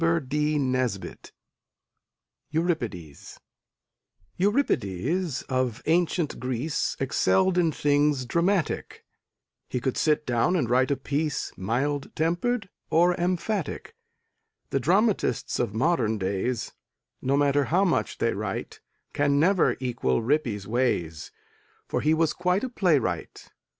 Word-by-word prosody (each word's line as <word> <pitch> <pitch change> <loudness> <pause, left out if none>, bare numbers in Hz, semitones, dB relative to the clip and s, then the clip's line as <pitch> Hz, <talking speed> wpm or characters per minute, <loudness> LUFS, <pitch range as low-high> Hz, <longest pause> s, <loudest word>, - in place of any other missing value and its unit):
EURIPIDES 120 - -3 1.0
Euripides, 175 - 0
of 130 -2 -1
ancient 170 -1 +1
Greece, 130 +5 -2
Excelled 180 +7 +2
in 170 -3 +3
things 145 -2 +1
dramatic; 170 +5 -1 0.6
He 125 - -1
could 130 +1 -2
sit 150 -1 +2
down 120 +8 +1
and 155 -9 +1
write 130 +1 +3
a 140 - +1
piece 145 +3 -2
Mild 135 +9 -1
tempered 185 +8 0 0.2
or 175 +2 +4
emphatic; 180 +1 -2 0.8
The 135 - +1
dramatists 195 - +1
of 100 - -1
modern 120 -5 +1
days 100 +5 -2 0.5
No 135 +2 +1
matter 145 0 +3
how 185 +7 +2
much 180 - 0
they - - +1
write - - -5 0.3
Can 145 0 +2
never 170 -6 +3
equal 120 - -1
Rippy's 120 -7 0
ways, 105 -10 -1 0.6
For - - -1
he 155 +2 +3
was 160 -1 +1
quite 180 +3 0
a 260 - -2
playwright. 145 - -1
145 Hz, 110 wpm, -26 LUFS, 125-175 Hz, 1.0 s, or